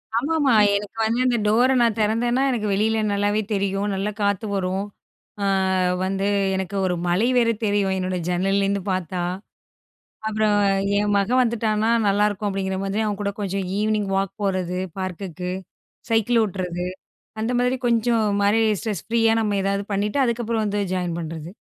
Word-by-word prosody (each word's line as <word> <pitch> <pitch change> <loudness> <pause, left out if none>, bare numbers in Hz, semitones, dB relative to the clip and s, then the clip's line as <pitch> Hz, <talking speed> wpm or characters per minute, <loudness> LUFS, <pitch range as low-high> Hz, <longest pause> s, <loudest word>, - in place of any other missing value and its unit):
ஆமா. 280 +8 0
ஆமா. 275 -3 +3 0.2
எனக்கு 205 +2 -4
வந்து 230 +2 0
இந்த 245 -1 +2
டோர 235 +5 +4
நான் 230 -2 +2
திறந்தேன்னா 240 +4 +1
எனக்கு 215 -4 -1
வெளில 220 +2 +1
நல்லாவே 205 +1 +1
தெரியும். 195 0 -1
நல்லா 200 +2 -2
காத்து 200 +1 0
வரும். 190 +1 -1 0.6
அ, - - +1 0.6
வந்து 195 +1 -1 0.3
எனக்கு 190 +1 -3
ஒரு 180 -1 0
மலை 180 +7 +2
வேற 235 -1 +4 0.2
தெரியும், 200 -2 +1
என்னோட 185 0 -2
ஜன்னல்ல 195 +2 +1
இருந்து 200 0 0
பார்த்தா. 180 -1 -2 1.1
அப்புறம் 215 -1 +1 0.4
என் 205 0 +1
மகன் 230 +6 +2
வந்துட்டான்னா, 225 -1 0 0.2
நல்லா 205 +1 +3
இருக்கும் 205 0 -3
அப்டிங்கிற 190 -1 -2
மாரி, 195 +2 -1
அவன் 205 -1 -3
கூட 200 0 -1
கொஞ்சம் 195 -1 -2
ஈவினிங் 210 -1 0
வாக் 195 -1 -1
போறது 185 -2 -1 0.2
பார்க்குக்கு, 180 -1 -4 0.6
சைக்கிள் 225 +1 +3
ஓட்டுறது, 180 -3 -3 0.6
அந்த 225 +3 -1
மாதிரி 250 +1 +1
கொஞ்சம் 230 -1 +2 0.2
மாரி 205 +3 +3 0.2
ஸ்ட்ரெஸ் 210 -8 -3
ஃப்ரீயா 225 -1 +3
நம்ம 205 -2 0
ஏதாவது 200 0 -1
பண்ணிட்டு, 210 +7 0
அதுக்கப்புறம் 230 -2 -1
வந்து 205 0 -1
ஜாயின் 175 -2 -2
பண்றது. 160 0 -6
205 Hz, 155 wpm, -23 LUFS, 190-225 Hz, 1.1 s, டோர